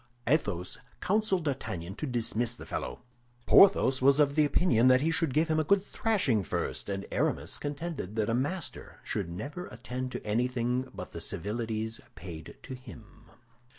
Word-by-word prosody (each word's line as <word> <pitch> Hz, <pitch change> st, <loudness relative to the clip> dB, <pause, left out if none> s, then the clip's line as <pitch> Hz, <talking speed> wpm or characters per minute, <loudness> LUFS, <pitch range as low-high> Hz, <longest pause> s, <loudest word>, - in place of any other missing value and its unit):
Athos 105 Hz, -, 0 dB, 0.2 s
counseled 195 Hz, -4 st, +1 dB
D'Artagnan 110 Hz, -, -3 dB
to 155 Hz, -, -3 dB
dismiss 120 Hz, -1 st, 0 dB
the -, -, -10 dB
fellow; -, -, -5 dB, 0.4 s
Porthos 135 Hz, -9 st, +6 dB
was 140 Hz, +2 st, +5 dB
of 145 Hz, -1 st, +4 dB
the 155 Hz, 0 st, +4 dB
opinion 135 Hz, -5 st, +3 dB
that 130 Hz, 0 st, +6 dB
he 160 Hz, +3 st, +2 dB
should 165 Hz, -3 st, +1 dB
give 155 Hz, +5 st, +2 dB
him 155 Hz, -1 st, +2 dB
a -, -, +3 dB
good 190 Hz, +5 st, +3 dB
thrashing 185 Hz, -, +1 dB
first; 95 Hz, -, -3 dB
and 95 Hz, 0 st, -3 dB
Aramis -, -, -1 dB
contended 145 Hz, -, -4 dB
that 110 Hz, -2 st, +1 dB
a 115 Hz, -, +1 dB
master 145 Hz, +8 st, -3 dB
should -, -, -2 dB
never 145 Hz, -, -6 dB
attend 125 Hz, +3 st, -5 dB
to -, -, -5 dB
anything 125 Hz, +3 st, 0 dB
but -, -, -8 dB
the -, -, -6 dB
civilities 110 Hz, +1 st, -3 dB
paid 80 Hz, -4 st, -9 dB
to 130 Hz, -, -7 dB
him. 120 Hz, -4 st, -13 dB
130 Hz, 165 wpm, -30 LUFS, 110-155 Hz, 0.4 s, Porthos